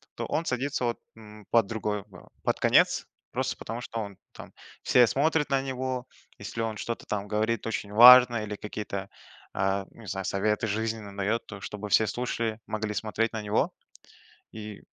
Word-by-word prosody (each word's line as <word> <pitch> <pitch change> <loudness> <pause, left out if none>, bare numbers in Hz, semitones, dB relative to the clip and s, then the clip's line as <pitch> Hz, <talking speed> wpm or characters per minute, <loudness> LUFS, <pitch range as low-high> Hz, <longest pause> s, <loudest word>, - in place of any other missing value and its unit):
то - - -4
он 165 - -1
садится 130 0 -1
вот, 120 - -1 0.2
м, 105 -2 -13
под 115 -3 +5
другой 105 -2 -2
ва 95 -4 -15
под - - 0
конец, - - +4 0.3
просто - - -2
потому 115 +2 -6
что 115 - -5
он 100 -3 -7 0.2
там, - - -11 0.3
все 125 -2 +5
смотрят 150 +4 +1
на 135 -1 +2
него. 130 -1 -3 0.3
Если 115 - -5
он 110 -1 -2
что-то, 115 +3 -5
там, 105 -1 -3
говорит 110 +2 0
очень 105 -2 -3
важное, 120 0 +9
или 105 0 -5
какие-то, 100 -2 -5 0.4
а, 95 0 0
ну - - -16
не - - -12
знаю, 95 0 -3
советы 105 +3 0
жизненные 110 -1 -3
дает, 110 +4 0
то 100 -2 -8
чтобы 105 0 -6
все 110 +2 +5
слушали, 115 -1 -2
могли 110 -1 -3
смотреть 110 +2 -1
на 110 - -3
него. 105 0 0 0.8
И, 105 -2 -8
110 Hz, 175 wpm, -28 LUFS, 105-120 Hz, 0.8 s, важное